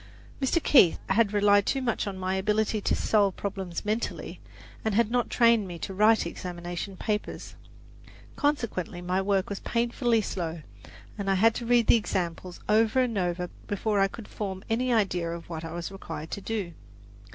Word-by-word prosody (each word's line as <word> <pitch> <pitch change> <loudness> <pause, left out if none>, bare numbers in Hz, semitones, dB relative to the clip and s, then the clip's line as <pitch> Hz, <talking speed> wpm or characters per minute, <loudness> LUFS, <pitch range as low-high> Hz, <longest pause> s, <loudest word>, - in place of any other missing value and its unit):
Mr. 265 +5 +2
Keith 195 - +6
had 200 +1 +3
relied 205 -1 +4
too 270 - +1
much 235 -4 -1
on 195 -2 -4
my 185 0 -2
ability 210 +2 0
to - - +1
solve 200 -3 +2
problems 190 -3 -4
mentally, 215 +3 -3 0.4
and 220 -2 0
had 230 0 +2
not 245 -1 +1
trained 230 -4 +4
me 175 -1 -6
to 190 - -5
write 215 +2 +4
examination 175 +2 -6
papers. 210 +1 -3 0.8
Consequently 235 - -1
my 180 +2 0
work 195 -1 +1
was 200 - -4
painfully 235 0 +1
slow, 170 -6 -4 0.6
and 195 -1 -2
I 195 - +3
had 225 +4 +4
to 235 0 -5
read 240 -1 +4
the 235 - +6
examples 180 -3 -3
over 220 +3 +3
and 250 -3 +1
over 180 -2 -1 0.2
before 205 +1 0
I 195 - +4
could 210 +2 -10
form 190 -2 -5
any 250 +3 +1
idea 190 -7 +1
of 170 0 -7
what 160 -1 -5
I 165 - -6
was 175 +1 -5
required 160 -5 -7
to 200 - -4
do. 200 -5 -3
200 Hz, 175 wpm, -27 LUFS, 180-225 Hz, 0.8 s, Keith